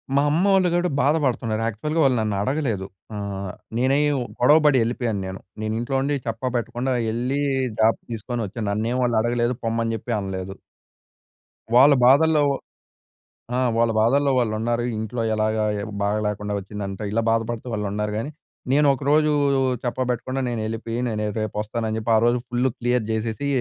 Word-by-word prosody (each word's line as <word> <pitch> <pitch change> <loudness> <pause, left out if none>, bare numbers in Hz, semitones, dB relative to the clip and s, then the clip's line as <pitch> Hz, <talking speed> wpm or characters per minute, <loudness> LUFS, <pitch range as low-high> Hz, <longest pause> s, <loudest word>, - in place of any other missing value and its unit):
మా 140 - +5
అమ్మోళ్ళు 190 +3 +3
గుడా 175 +1 +1
బాధపడుతున్నారు. 130 -6 +1
యాక్చువ‌ల్‌గా 150 +9 -1
వాళ్ళు 135 -2 +4
నన్ను 105 -2 -1
అడగలేదు. 115 -5 -1 0.3
ఆహ్, 100 -2 -4 0.3
నేనై 130 +4 +2 0.4
గొడవపడి 150 +2 +5
ఎళ్ళిపోయాను 115 -3 -2
నేను. 95 0 -6 0.2
నేను 110 0 -2
ఇంట్లో 125 +3 -2
ఉండి 145 +2 0
చేప్పా 115 +3 -2
పెట్టకుండా 125 +2 -2 0.2
ఎళ్ళి 125 +4 -1 0.4
జాబ్ 110 +1 +4
తీసుకొని 115 +1 -3
వచ్చాను. 105 +2 -5
నన్నేమి 115 +5 -1
వాళ్ళు 120 -2 +1
అడగలేదు, 120 +1 0
పొమ్మని 115 0 0
చెప్పి 120 +3 -4
అనలేదు. 95 0 -5 1.2
వాళ్ళ 140 +4 +8
బాధల్లో 150 +4 +5 1.2
ఆ! - - +1 0.2
వాళ్ళ 115 0 +3
బాధల్లో 140 +5 +3
వాళ్ళు 120 -3 +1
ఉన్నారు. 120 +1 0
ఇంట్లో 110 +2 -3
ఎలాగా, 110 0 0 0.4
బాగాలేకుండా 105 0 -1
వచ్చిందంట. 100 0 -6
ఇలా 115 +2 +1
బాధపడుతూ 115 +1 -1
వాళ్ళు 105 -2 -2
ఉన్నారు 105 0 -2
గానీ. 125 +7 -3 0.4
నేను 145 +1 +4
ఒకరోజు 150 +3 +2 0.5
చెప్పబెట్టకుండా, 130 +1 -2
నేను 120 -2 -2
ఎళ్ళిపోయి. 115 +1 -4
నేను 105 -1 -2 0.2
రేపు 110 -1 -4
వస్తానని 110 0 -3
చెప్పి 110 +1 -3
ఆ - - +5
రోజు 120 +1 +3
ఫుల్ 125 +2 +1
క్లియర్ 120 -1 +1
చేసేసి 110 +5 -2
115 Hz, 145 wpm, -23 LUFS, 110-130 Hz, 1.2 s, వాళ్ళ